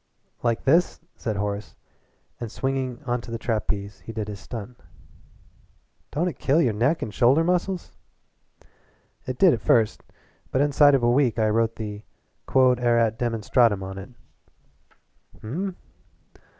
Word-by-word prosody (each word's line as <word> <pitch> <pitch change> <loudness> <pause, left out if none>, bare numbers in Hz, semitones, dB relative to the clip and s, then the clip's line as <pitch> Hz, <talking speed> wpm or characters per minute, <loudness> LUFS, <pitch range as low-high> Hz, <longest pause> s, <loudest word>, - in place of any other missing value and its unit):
"Like 115 -2 0
this!" 165 +6 +3 0.2
said 110 -3 -3
Horace, 100 0 -4 0.6
and 120 -3 -5
swinging 135 0 -3
onto 120 -2 -3
the 115 - -2
trapeze 105 -3 -3
he - - -9
did 110 -2 -4
his 100 -1 -7
stunt. 120 +2 -8 1.3
"Don't 160 +6 -1
it 175 - -5
kill 145 +4 +2
your 125 -9 +2
neck 125 +10 +1
an' 110 - -5
shoulder 130 +9 +4
muscles?" 180 +1 -1 1.4
"It 130 -1 -3
did 180 0 +6
at 115 - -2
first, 115 -7 +2 0.5
but 130 - 0
inside 145 0 +5
of 130 - 0
a 120 - +4
week 125 -3 +2
I 110 -1 +2
wrote 115 +1 +1
the 105 -2 -6 0.5
QUOD 130 -2 +4
ERAT 115 -2 +2
DEMONSTRANDUM 115 -3 +2
on 95 0 -7
it." 95 - -9 1.3
"Hm!" 175 - -4
120 Hz, 140 wpm, -24 LUFS, 110-135 Hz, 1.4 s, did